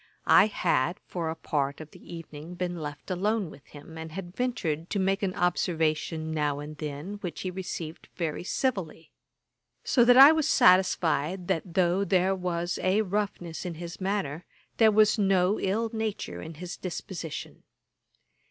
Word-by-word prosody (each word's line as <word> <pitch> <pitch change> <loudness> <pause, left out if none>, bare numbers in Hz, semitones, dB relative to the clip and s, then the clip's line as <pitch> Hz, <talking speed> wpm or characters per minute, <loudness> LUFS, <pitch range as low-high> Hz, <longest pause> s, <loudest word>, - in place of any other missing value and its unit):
I - - +7
had, 175 -4 0
for 170 -3 -3
a 160 - -3
part 140 -3 -2
of 155 -1 -10
the - - -15
evening, 165 +1 -9
been 175 0 -3
left 145 +3 -7
alone 200 0 0
with 140 - -15
him, 155 +2 -11
and 160 0 -7
had 180 0 -7
ventured 170 -11 -2
to - - -2
make 195 +1 +1
an 190 -2 -1
observation 160 -2 0
now 150 -2 0
and 150 +1 -7
then, 150 +7 -5
which 175 -3 -5
he 185 - -3
received 175 -3 -6
very 165 -1 -3
civilly; 185 - -2 0.7
so 245 - +4
that 245 +1 +6
I 275 +3 +11
was 315 -2 +1
satisfied 180 -1 +3
that 175 -2 -2
though 185 +1 +3
there 190 -1 +2
was 175 -2 -2
a 190 +4 +2
roughness 195 -4 -3
in 175 -3 -5
his 170 +3 -8
manner, 185 -5 -2 0.3
there 220 -1 +6
was 215 +1 +4
no 195 0 +3
ill 220 +4 0
nature 215 - -3
in 160 - -8
his 180 +4 -7
disposition. 175 -3 -6
180 Hz, 160 wpm, -28 LUFS, 160-195 Hz, 0.7 s, I